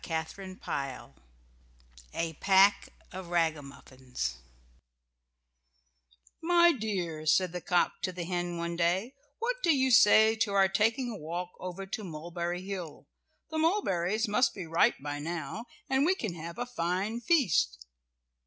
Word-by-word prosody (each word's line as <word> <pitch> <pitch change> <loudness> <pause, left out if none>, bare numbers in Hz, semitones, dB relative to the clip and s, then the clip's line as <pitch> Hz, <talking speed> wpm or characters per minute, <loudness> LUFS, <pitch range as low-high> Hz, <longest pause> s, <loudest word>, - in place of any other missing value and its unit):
A 165 -1 -2
PACK 195 +1 +4 0.2
OF 185 -1 -7
RAGAMUFFINS 140 - -3 2.0
"My 345 +1 +5
dear," 180 - -3
said 185 +3 +3
the 180 0 -5
cock 175 +2 +1
to 185 - -1
the 180 -1 -5
hen 175 0 -3
one 170 0 -3
day, 180 +8 0 0.2
"what - - -1
do 345 - +1
you 265 -4 +3
say 220 0 +6
to 215 -2 0
our 195 -1 +5
taking 225 +6 +1
a 215 - -6
walk 175 +2 -5
over 185 +1 -6
to 205 +3 -5
Mulberry 175 +1 -5
Hill? 185 -6 -7 0.4
The 315 - -1
mulberries 220 - +1
must 210 +5 +2
be 190 -4 -6
ripe 165 +1 +3
by 145 0 -4
now, 165 - -5 0.2
and 265 +1 +2
we 360 +5 +3
can 215 - -4
have 170 +3 -8
a 245 - -2
fine 200 0 -2
feast." 155 - +2
185 Hz, 135 wpm, -30 LUFS, 170-220 Hz, 2.0 s, say